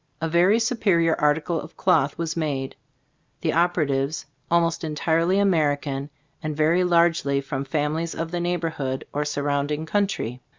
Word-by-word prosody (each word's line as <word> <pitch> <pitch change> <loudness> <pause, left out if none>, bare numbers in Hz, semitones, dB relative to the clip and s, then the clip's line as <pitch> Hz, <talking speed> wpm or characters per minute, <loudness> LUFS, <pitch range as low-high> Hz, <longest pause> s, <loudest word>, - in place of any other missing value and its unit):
A 165 - -1
very 175 +6 +4
superior 200 -8 +2
article 150 +2 +1
of 160 - -12
cloth 150 -7 +2
was 165 -1 -3
made, 140 -5 -2 0.7
the - - 0
operatives 155 -4 +1 0.2
almost 170 -1 +2
entirely 165 +4 +1
American, 145 -7 +1 0.3
and 155 -1 -4
very 165 +4 +3
largely 170 -5 +3
from 135 0 -4
families 155 +3 -1
of 165 0 -4
the 175 - -2
neighborhood 165 -6 -2
or 150 +1 -1
surrounding 145 +1 -1
country. 190 - -1
160 Hz, 135 wpm, -24 LUFS, 145-170 Hz, 0.7 s, very